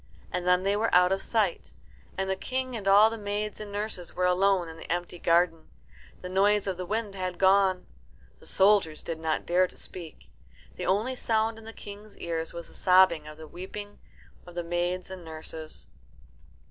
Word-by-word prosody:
And 180 0 -2
then 180 0 +4
they 200 +1 +2
were 220 +2 +1
out 180 +1 +6
of 195 0 +1
sight, 180 - -1 0.4
and 190 0 -1
the 190 - 0
King 255 +4 -3
and 205 -3 -5
all 205 +3 +7
the 225 - -5
maids 205 +1 -3
and 210 -1 -7
nurses 205 -4 -4
were 180 - +1
alone 185 0 +3
in 160 - -9
the 165 - -8
empty 175 0 -2
garden. 165 -1 +2 0.5
The 180 - -6
noise 200 +2 +3
of 190 -2 -1
the 180 -1 -5
wind 215 0 -2
had 185 -2 -4
gone. 190 -1 +4 0.5
The - - -15
soldiers 190 -6 +3
did 165 -1 -4
not 160 -1 -1
dare 180 +2 +3
to - - -18
speak. 170 -4 -10 0.4
The - - -4
only 215 +8 +1
sound 225 -2 0
in 225 - -14
the 225 - -7
King's 205 -1 -11
ears 165 -1 -3
was 170 -1 -8
the - - -18
sobbing 180 -4 +4
and 155 0 -11
weeping 205 +3 -7 0.5
of 175 - -12
the 175 - -2
maids 175 +2 -2
and 185 -2 -8
nurses. 160 -1 -7
185 Hz, 190 wpm, -28 LUFS, 175-205 Hz, 0.5 s, all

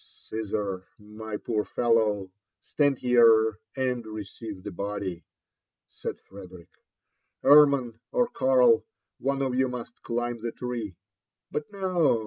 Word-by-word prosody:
" - - -26
Caesar, 105 -3 -3
my 105 +1 -7
poor 105 -2 -1
fellow, 110 -6 +1 0.3
stand 145 -3 +1
here 115 -3 +5 0.2
and 125 -2 -1
receive 105 -1 -8
the 105 - -5
body," 100 -2 -4 0.7
said - - -6
Frederick, 90 -3 -13 0.4
" - - -51
Hermann 140 -6 +6
or 245 - +2
Karl, 130 - +4 0.4
one 135 +1 0
of 130 -2 -1
you 130 +1 +2
must 125 -2 -7
climb 120 0 -3
the 115 0 -3
tree, 120 -6 -5 0.6
fiut 150 - -2
no 185 - +2
115 Hz, 125 wpm, -27 LUFS, 105-130 Hz, 0.7 s, Hermann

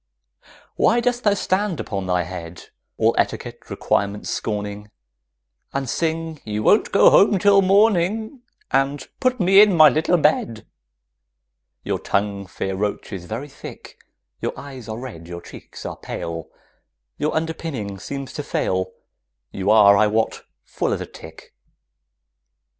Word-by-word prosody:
Why 235 - +4
dost 245 0 0
thou 205 -1 +3
stand 190 -2 -1
upon 95 -3 -4
thy 90 -1 +1
head, 85 -1 -9 0.3
All - - +3
etiquette - - -3
requirements 100 +1 -1
scorning, 105 -1 -4 0.8
And 140 -1 -2
sing 160 +2 -2
"You 105 0 -3
won't 210 - +4
go 200 - +6
home 200 0 +5
till 200 +1 +5
morning" 210 +4 +2 0.3
And 135 0 0
"Put 255 -1 +1
me 195 +2 +7
in 205 -4 +5
my 155 -1 +9
little 160 +3 +2
bed"? 115 -8 +1 1.2
Your - - -2
tongue, 100 -1 -2
fair 95 0 -4
roach, 105 +1 -3
is 90 -3 -6
very 115 +10 -5
thick, 135 - -11 0.4
Your - - -3
eyes 130 -5 -9
are 110 - -4
red, 115 -10 -8
your 85 0 -7
cheeks 85 - -12
are - - -5
pale, 85 -1 -6 0.7
Your 150 - -1
underpinning 160 -11 -3
seems 140 +6 -6
to - - -4
fail, 95 -9 -2 0.6
You 100 +1 -2
are, 105 -2 +7
I 105 +1 +4
wot, 110 +1 0 0.2
full - - -2
as - - -3
a - - -4
tick. 80 0 -13
130 Hz, 140 wpm, -22 LUFS, -, 1.2 s, my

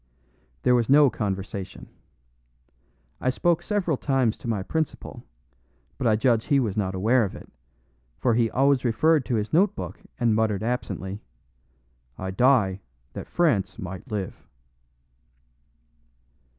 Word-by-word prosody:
There 125 - +4
was 120 -2 +2
no 140 -1 +6
conversation. 95 -2 -5 1.3
I 130 - 0
spoke 170 +5 +1
several 175 -6 -1
times 130 -6 +1
to - - -8
my 105 -5 -1
principal, 160 +7 -4 0.8
but 130 - 0
I 110 - +4
judge 115 0 +2
he 140 -2 +3
was 110 -7 -1
not 95 -3 -1
aware 115 +6 +3
of 100 - -4
it, - - -11 0.7
for 120 - +1
he 115 0 +2
always 135 +1 +2
referred 145 +5 +2
to 120 - -1
his 105 +3 -2
note 195 +5 +3
book - - -6 0.2
and 120 -3 +3
muttered 110 -2 0
absently, 110 -4 -3 1.0
"I 95 0 -4
die 100 -4 +3 0.3
that - - -7
France 120 - +1
might 95 +4 -7
live." 100 -3 -4
115 Hz, 135 wpm, -25 LUFS, 100-135 Hz, 1.3 s, no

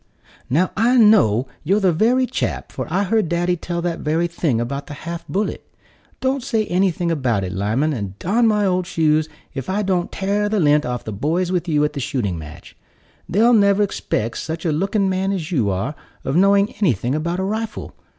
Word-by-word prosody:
"Now 165 +8 +2
I 240 +5 +3
know 195 - +5 0.2
you're 195 +7 +2
the 190 -3 +3
very 240 +9 +3
chap, 250 - -3
for - - -5
I 195 +3 +1
heard 205 -2 +1
daddy 175 +1 +1
tell 170 0 -4
that 170 -1 -2
very 160 +3 0
thing 165 -8 -1
about 140 +4 -4
the 145 - -7
half 170 +2 -7
bullet. 205 +3 -2 0.6
Don't 265 +1 0
say 225 -4 0
anything 180 -2 0
about 125 -10 0
it, 90 - -4
Lyman, 110 - 0
and 100 -6 -5
darn 225 - +2
my 210 -2 +2
old 180 -1 0
shoes, 155 -1 +1 0.2
if 135 -3 -5
I 205 +2 0
don't 185 -2 0
tare 205 +2 0
the 215 -1 +1
lint 150 -4 +3
off 125 -1 -3
the 110 - -5
boys 165 - -1
with 180 -1 -1
you 150 -2 +2
at 150 - -2
the 145 - -4
shooting 110 - -2
match. 75 -1 -11 0.5
They'll 230 +6 +4
never 200 -1 +4
'spect 115 - -2
such 160 +2 -5
a 165 - +2
looking 195 +5 0
man 190 +1 0
as 180 -3 -3
you 120 - +1
are 100 +10 -2 0.3
of 135 - -1
knowing 200 +3 +4
anything 125 - +1
about 170 +4 -2
a - - -1
rifle. 220 +3 -4
175 Hz, 200 wpm, -20 LUFS, 145-200 Hz, 0.6 s, know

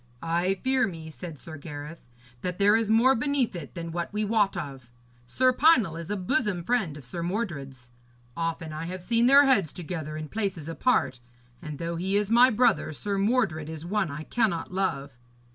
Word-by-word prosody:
'I 175 +3 +1
fear 260 -2 +2
me,' 160 -4 -8
said 155 +3 -8
Sir 155 +3 -10
Gareth, 145 0 -9 0.3
'that 180 -1 -3
there 205 +1 +5
is 225 -1 +1
more 235 +4 +5
beneath 265 -3 0
it 145 -6 -8
all 165 -1 -5
than 170 0 -2
we 210 +1 -1
wot 205 -3 +1
of. 135 -7 -7 0.4
Sir 255 - +3
Pinel 255 - +4
is 165 -1 -7
a 205 - -1
bosom 210 -3 0
friend 195 -8 0
of 140 - -12
Sir 170 +7 -5
Mordred's. 140 - -4 0.4
Often 165 -1 -3
have 160 +2 -5
I - - -12
seen 230 +4 +2
their 280 +2 +7
heads 200 - +3
together 160 -3 -5
in 155 0 -5
places 190 -6 -3
apart. 165 - +1 0.4
And 150 -3 -7
though 170 +1 -3
he 190 +3 -1
is 210 +1 -1
my 245 +2 +7
brother, 230 -8 +2
Sir 200 +6 -2
Mordred 195 -8 +1
is 160 0 -7
one 195 -1 0
I 145 +2 -6
cannot 180 -5 -1
love.' 140 -9 -2
180 Hz, 190 wpm, -27 LUFS, 155-220 Hz, 0.4 s, their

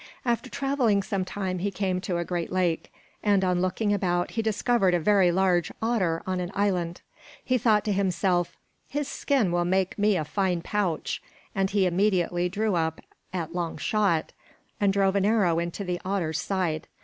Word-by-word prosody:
After 235 -2 0
traveling 255 -8 +1
some 195 -1 -1
time 185 -1 -3
he 200 +3 0
came 185 -2 -1
to 180 -2 -2
a 170 - -2
great 175 -1 -3
lake, 180 -3 0 0.3
and 200 -2 +3
on 180 -1 +1
looking 205 +3 0
about 175 -3 0
he 225 - -1
discovered 220 -3 +2
a - - +2
very 190 0 +4
large 180 -2 +2
otter 195 -8 0
on 185 -1 -1
an 175 -1 -3
island. 180 -4 0 0.4
He 255 -1 +2
thought 215 -2 +3
to 210 - +1
himself, 185 -2 0 0.3
"His 290 0 -2
skin 265 -10 +1
will 175 0 +1
make 185 +2 0
me 205 -1 +3
a 155 - -2
fine 180 0 -1
pouch." 190 -7 -1 0.3
And 195 -2 +1
he 200 -1 +2
immediately 180 -1 +1
drew 210 +2 0
up 160 -2 0 0.3
at 170 -3 -4
long 175 -2 -3
shot 200 -7 +1 0.5
and 200 -2 +3
drove 195 0 +2
an 200 - +2
arrow 200 -6 +3
into 170 +4 -3
the 180 -2 -3
otter's 180 -5 -1
side. 180 -5 -1
190 Hz, 180 wpm, -26 LUFS, 175-205 Hz, 0.5 s, very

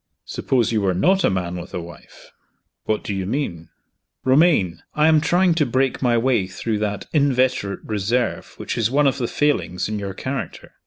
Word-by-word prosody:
"Suppose 120 -5 0
you 110 -2 +1
were 95 -2 +1
not 185 - +3
a - - +4
man 90 -2 -2
with 85 - -8
a - - -2
wife." 85 0 -13 0.5
"What 110 - -1
do 100 - -3
you 95 -1 -3
mean?" 100 - -3 0.6
"Romayne, 130 - +3
I 150 +1 +4
am 155 -1 +5
trying 175 +3 +3
to 160 -3 +2
break 130 +2 0
my 120 -2 +3
way 115 -5 +1
through 105 +3 -3
that 105 -1 -2
inveterate 130 -8 +1
reserve 110 +4 -2
which - - -4
is 110 -1 +2
one 145 +3 +2
of 135 - +1
the 120 - -1
failings 90 - 0
in 105 0 -3
your 100 -1 -5
character. 130 +5 -5
115 Hz, 190 wpm, -21 LUFS, 95-140 Hz, 0.6 s, am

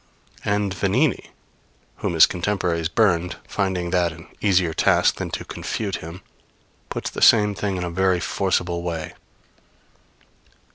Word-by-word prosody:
And 105 -1 0
Vanini 105 - 0 0.7
whom 85 - -2
his 80 - +9
contemporaries 90 -3 -1
burned, 90 -4 +1
finding 95 -3 -2
that 90 -2 +2
an 85 0 -12 0.2
easier 90 -5 +2
task - - +3
than - - -4
to - - -5
confute 100 -3 -4
him 85 +4 -10 0.7
puts - - -4
the - - -6
same 105 -3 +6
thing 100 -1 -2
in 90 - -3
a 85 - -3
very 95 0 +2
forcible 90 -2 -1
way. 85 -2 -4
90 Hz, 135 wpm, -22 LUFS, 85-100 Hz, 0.7 s, his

